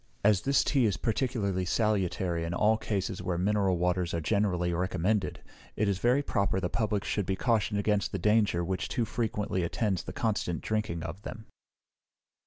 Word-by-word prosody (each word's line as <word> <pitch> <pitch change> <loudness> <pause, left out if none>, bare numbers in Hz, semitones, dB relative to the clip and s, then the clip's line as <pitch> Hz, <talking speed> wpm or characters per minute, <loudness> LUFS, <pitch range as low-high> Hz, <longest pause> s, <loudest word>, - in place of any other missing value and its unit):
As 105 -2 +4
this 140 0 +3
tea 135 -5 +2
is 100 -4 +1
particularly 110 -6 -1
salutary 95 -4 0
in 85 +1 -3
all 110 +4 +4
cases 100 -2 -2
where 90 -2 -2
mineral 95 0 +2
waters 90 0 0
are - - 0
generally 90 -1 +1
recommended, 95 +3 -1 0.3
it 105 - +1
is 100 -2 0
very 125 +6 +3
proper 100 -6 0
the 90 -2 -2
Public 105 -3 0
should 105 -3 -1
be 95 - 0
cautioned 110 -2 +1
against 105 -1 +1
the - - -2
danger 105 -3 +2
which 95 +1 -2
too 120 - 0
frequently 105 -5 -2
attends 95 +2 0
the - - -7
constant 105 -6 -1
drinking 110 -7 -2
of 85 +4 -6
them. 110 +1 -8
100 Hz, 175 wpm, -29 LUFS, 90-110 Hz, 0.3 s, As